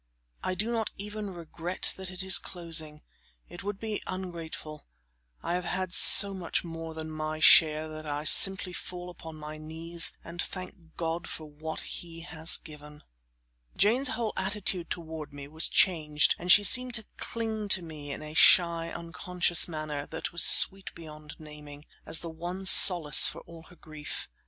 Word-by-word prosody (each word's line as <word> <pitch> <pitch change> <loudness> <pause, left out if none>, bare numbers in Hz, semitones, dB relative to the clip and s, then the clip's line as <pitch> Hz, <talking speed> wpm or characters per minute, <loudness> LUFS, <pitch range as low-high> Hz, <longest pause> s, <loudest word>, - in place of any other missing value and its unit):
I 185 - -3
do 215 +5 -4
not 225 -2 -3
even 210 0 -8
regret 175 0 -6
that 190 -1 -7
it 185 0 -7
is 190 -1 +5
closing; 165 -4 -3 0.4
it 175 - -12
would 200 0 -6
be 220 -2 -5
ungrateful; 165 -5 -9 0.6
I 170 - -4
have 180 0 -3
had 185 -1 -5
so 200 +1 +8
much 180 -3 -4
more 165 -1 -9
than 160 0 -8
my 155 0 -6
share 155 0 +4
that 155 0 -10
I 145 0 -5
simply 180 +3 +4
fall 180 0 -9
upon 160 -2 -13
my 155 0 -10
knees 165 +2 0
and 175 - -8
thank 185 -3 -11
God 165 0 -5
for 155 - -8
what 155 +2 -9
He 165 -1 -9
has 165 -1 +2
given. 150 -1 -15 0.7
Jane's 240 +7 +1
whole 225 -3 -4
attitude 190 -2 -4
toward 160 -3 -8
me 140 -1 -11
was 160 +2 +2
changed, 150 -6 +2
and 180 +1 0
she 205 - +7
seemed 250 +4 +4
to 220 -2 -1
cling 220 -2 -5
to 190 -2 +4
me 150 -3 -10
in 150 - -8
a 155 0 -10
shy, 170 0 +3
unconscious 175 +1 +1
manner, 155 -3 -7
that 160 +1 -7
was 170 - +2
sweet 195 0 +4
beyond 155 -2 -13
the - - -16
naming, 150 -1 -13 0.2
as 160 - +2
the 170 - -8
one 175 +4 -8
solace 175 -5 +7
for - - -7
all 165 -1 -15
her 180 - -18
grief. 155 -3 -8
170 Hz, 170 wpm, -27 LUFS, 155-185 Hz, 0.7 s, so